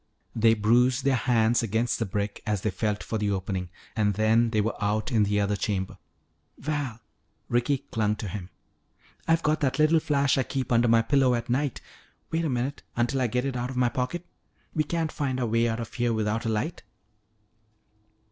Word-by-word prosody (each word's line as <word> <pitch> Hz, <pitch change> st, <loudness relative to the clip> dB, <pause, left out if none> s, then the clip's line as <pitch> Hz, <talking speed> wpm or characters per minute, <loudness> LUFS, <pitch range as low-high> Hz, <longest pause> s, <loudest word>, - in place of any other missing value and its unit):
They 115 Hz, 0 st, +4 dB
bruised 125 Hz, +5 st, +3 dB
their 140 Hz, -1 st, +3 dB
hands 120 Hz, -1 st, +2 dB
against 115 Hz, +2 st, 0 dB
the 115 Hz, -, -1 dB
brick 100 Hz, +2 st, -3 dB
as 105 Hz, -3 st, -1 dB
they 105 Hz, -, 0 dB
felt 105 Hz, +1 st, -2 dB
for 110 Hz, -, -3 dB
the 105 Hz, -1 st, 0 dB
opening, 95 Hz, -2 st, -2 dB, 0.3 s
and 105 Hz, -3 st, +1 dB
then 110 Hz, +2 st, +3 dB
they 110 Hz, -1 st, 0 dB
were 110 Hz, +2 st, +1 dB
out 105 Hz, +1 st, 0 dB
in 110 Hz, -3 st, +3 dB
the 105 Hz, +1 st, +1 dB
other 100 Hz, 0 st, +1 dB
chamber. 95 Hz, -2 st, -2 dB, 0.6 s
"Val," 145 Hz, -5 st, -3 dB, 0.5 s
Ricky 120 Hz, +3 st, +1 dB
clung 105 Hz, -1 st, +1 dB
to 105 Hz, -, -6 dB
him, 95 Hz, -1 st, -6 dB, 0.8 s
"I've 165 Hz, 0 st, +3 dB
got 155 Hz, +1 st, +2 dB
that 135 Hz, -3 st, 0 dB
little 155 Hz, +1 st, +4 dB
flash 140 Hz, -3 st, +2 dB
I -, -, +4 dB
keep 130 Hz, -1 st, -3 dB
under 120 Hz, 0 st, +4 dB
my 115 Hz, 0 st, +4 dB
pillow 130 Hz, 0 st, +3 dB
at 120 Hz, +1 st, -3 dB
night. 140 Hz, +1 st, 0 dB, 0.5 s
Wait 165 Hz, +1 st, 0 dB
a 160 Hz, -, 0 dB
minute 130 Hz, +2 st, -2 dB
until 120 Hz, +3 st, +1 dB
I 125 Hz, -, +2 dB
get 125 Hz, +3 st, -1 dB
it 135 Hz, -2 st, -2 dB
out 125 Hz, 0 st, -2 dB
of 130 Hz, -, -6 dB
my 125 Hz, -1 st, +3 dB
pocket. 130 Hz, +9 st, -3 dB, 0.5 s
We 155 Hz, -, +1 dB
can't 160 Hz, 0 st, -2 dB
find 130 Hz, -3 st, -2 dB
our 125 Hz, -, 0 dB
way 115 Hz, +1 st, +2 dB
out 115 Hz, 0 st, -2 dB
of 115 Hz, -, -6 dB
here 120 Hz, -1 st, 0 dB
without 110 Hz, +1 st, -1 dB
a -, -, 0 dB
light." 110 Hz, +10 st, -2 dB
120 Hz, 200 wpm, -27 LUFS, 110-130 Hz, 0.8 s, They